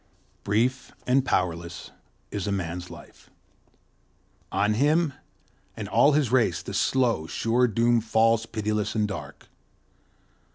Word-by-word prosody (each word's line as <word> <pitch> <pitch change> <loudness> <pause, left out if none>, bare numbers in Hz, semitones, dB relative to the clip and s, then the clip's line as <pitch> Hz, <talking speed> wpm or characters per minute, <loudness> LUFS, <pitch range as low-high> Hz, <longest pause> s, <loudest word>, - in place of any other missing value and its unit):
Brief 120 +6 0
and 130 +1 +3
powerless 85 -7 -2 0.4
is 100 -2 -3
Man's 90 -3 -3
life; - - -14 1.2
on 100 +2 +1
him 150 +6 +2 0.6
and - - -5
all 145 - +4
his 140 -5 +1
race 115 -10 +2
the - - -7
slow, 120 -11 +1
sure 120 +8 +1
doom 115 +1 +2
falls 115 0 +2
pitiless 105 -1 -2
and 105 -1 +1
dark. 75 -8 -8
110 Hz, 115 wpm, -26 LUFS, 95-125 Hz, 1.2 s, all